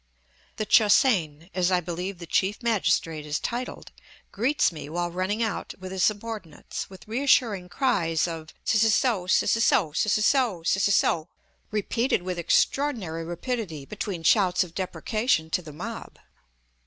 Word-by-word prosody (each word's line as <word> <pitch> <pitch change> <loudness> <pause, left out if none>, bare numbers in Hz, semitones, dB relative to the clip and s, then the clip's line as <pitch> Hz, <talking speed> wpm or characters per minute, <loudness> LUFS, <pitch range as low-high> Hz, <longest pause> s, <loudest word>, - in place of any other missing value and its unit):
The 215 - -3
Che 215 - +5
hsein, 175 - +2
as 180 0 +1
I 180 - +3
believe 180 +2 -5
the 170 - -8
chief 195 +7 0
magistrate 175 -8 +1
is 150 0 -2
titled, 245 +2 -5 0.4
greets 250 +5 +1
me 150 -3 -8
while 175 +2 -2
running 190 +6 -1
out 220 - -3
with 185 0 -8
his 190 -1 -1
subordinates, 210 -6 -3
with 190 +1 -14
reassuring 225 -6 +2
cries 175 - +1
of 160 -2 -7 0.2
"S 220 0 +4
s 225 +3 +3
o, 215 -8 +1
s 185 - +3
s 230 0 +3
o, 165 -9 +2
s 210 +8 +1
s 215 +5 +4
o, 240 -11 0
s 195 +4 +2
s 200 - +4
o," 160 -1 0 0.4
repeated 220 +1 0
with 180 -1 -3
extraordinary 185 - +1
rapidity 175 - -4
between 195 -2 -5
shouts 185 0 +4
of 170 -2 -11
deprecation 185 -1 -1
to 180 - +1
the 160 -3 -10
mob. 145 - -7
185 Hz, 165 wpm, -26 LUFS, 170-220 Hz, 0.4 s, Che